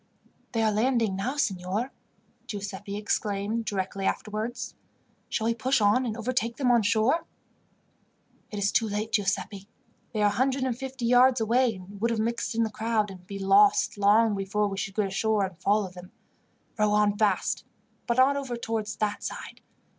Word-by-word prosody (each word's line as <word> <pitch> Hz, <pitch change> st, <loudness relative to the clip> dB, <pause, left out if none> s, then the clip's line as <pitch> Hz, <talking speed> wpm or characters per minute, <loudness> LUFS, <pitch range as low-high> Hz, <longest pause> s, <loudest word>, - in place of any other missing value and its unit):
"They 225 Hz, -1 st, +1 dB
are 215 Hz, -, +3 dB
landing 225 Hz, -2 st, +1 dB
now, 250 Hz, +9 st, -2 dB
signor," 200 Hz, 0 st, -1 dB, 0.6 s
Giuseppi 200 Hz, 0 st, -5 dB
exclaimed 210 Hz, +1 st, -1 dB
directly 195 Hz, -1 st, -3 dB
afterwards. 220 Hz, +4 st, -3 dB, 0.6 s
"Shall 220 Hz, -, -1 dB
we 230 Hz, -, +2 dB
push 255 Hz, +4 st, +1 dB
on 215 Hz, +5 st, +3 dB
and 220 Hz, 0 st, -3 dB
overtake 235 Hz, 0 st, -1 dB
them 255 Hz, -3 st, +2 dB
on 240 Hz, -1 st, +5 dB
shore?" 225 Hz, -, +2 dB, 1.2 s
"It 210 Hz, -, -6 dB
is 200 Hz, 0 st, +1 dB
too 225 Hz, -, +2 dB
late, 210 Hz, +2 st, -3 dB
Giuseppi. 200 Hz, -1 st, -1 dB, 0.4 s
They 215 Hz, -2 st, 0 dB
are 205 Hz, -, +5 dB
a 205 Hz, -, -4 dB
hundred 265 Hz, 0 st, +1 dB
and 255 Hz, -2 st, 0 dB
fifty 265 Hz, -1 st, -5 dB
yards 250 Hz, +1 st, +5 dB
away, 230 Hz, +1 st, +2 dB
and 195 Hz, +2 st, -11 dB
would 230 Hz, -, +2 dB
have 230 Hz, -1 st, -1 dB
mixed 230 Hz, +1 st, -1 dB
in 230 Hz, -, +2 dB
the 220 Hz, -, -2 dB
crowd, 215 Hz, -1 st, 0 dB
and 180 Hz, -1 st, -13 dB
be 200 Hz, -, -6 dB
lost, 195 Hz, +1 st, +4 dB
long 210 Hz, +2 st, +4 dB
before 200 Hz, +2 st, 0 dB
we 195 Hz, -, -4 dB
should 195 Hz, 0 st, -4 dB
get 210 Hz, -, +1 dB
ashore 205 Hz, +1 st, +1 dB
and 185 Hz, -1 st, -8 dB
follow 200 Hz, +2 st, +1 dB
them. 180 Hz, 0 st, -12 dB, 0.7 s
Row 210 Hz, 0 st, +3 dB
on 210 Hz, -1 st, +3 dB
fast, 205 Hz, -3 st, +1 dB, 0.4 s
but 235 Hz, -, 0 dB
not 265 Hz, +2 st, +5 dB
over 265 Hz, -3 st, -3 dB
towards 220 Hz, -2 st, -3 dB
that 210 Hz, -1 st, -2 dB
side. -, -, -7 dB
215 Hz, 175 wpm, -27 LUFS, 200-235 Hz, 1.2 s, on